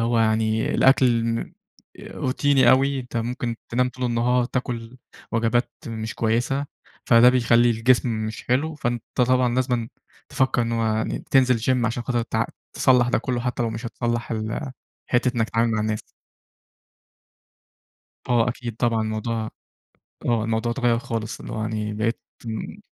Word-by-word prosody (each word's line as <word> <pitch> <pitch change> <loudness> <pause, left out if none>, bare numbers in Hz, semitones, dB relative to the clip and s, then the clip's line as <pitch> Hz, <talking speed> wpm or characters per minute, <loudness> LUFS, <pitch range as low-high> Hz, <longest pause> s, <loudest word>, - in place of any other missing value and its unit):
هو 115 0 +1
يعني 110 0 +1
الأكل 125 -3 +4
مم 115 0 -2 0.5
روتيني 130 -1 +2
أوي، 135 +1 +3
أنت 125 -1 -8
ممكن 120 0 -2
تنام 125 +1 +1
طول 125 0 -6
النهار، 120 +1 +2
تاكل 120 -1 -4 0.4
وجبات 115 +2 +1 0.2
مش 110 -1 -5
كويسة، 120 +5 0 0.4
فده 115 +1 +7
بيخلّي 120 -1 +4
الجسم 120 +2 +2 0.2
مش 110 - -7
حلو، 150 +6 +1
فأنت 120 -4 -2
طبعًا 125 -1 +2
لازمًا 125 -3 0 0.4
تفكّر 130 -2 +1
إن 115 - -2
هو 115 -1 0
يعني 110 0 -1
تنزل 130 -3 +4
Gym 120 +1 +1
عشان 120 +1 -2
خاطر 120 -1 -1
ت - - -4 0.4
تصَلّح 125 -2 +3
ده - - +2
كلّه 125 0 -2
حتى 125 0 -2
لو 115 - -1
مش 115 +2 -5
هتصَلّح 120 0 -3
ال 110 +3 -3 0.3
حتة 125 0 +1
إنّك 115 -1 +1
تتعامل 115 0 +2
مع 110 - 0
الناس. 110 0 -2 2.3
آه 120 -1 +3
أكيد 120 -2 -5
طبعًا 115 -1 +1
الموضوع 110 +1 -2 0.8
آه 115 -2 +1
الموضوع 115 +1 0
اتغَّير 120 -2 +1
خالص، 115 -2 -4
اللي - - -8
هو 110 - -3
يعني 110 -1 -2
بقيت 115 +2 -1 0.3
امم. 110 -1 -5
120 Hz, 150 wpm, -23 LUFS, 115-125 Hz, 2.3 s, فده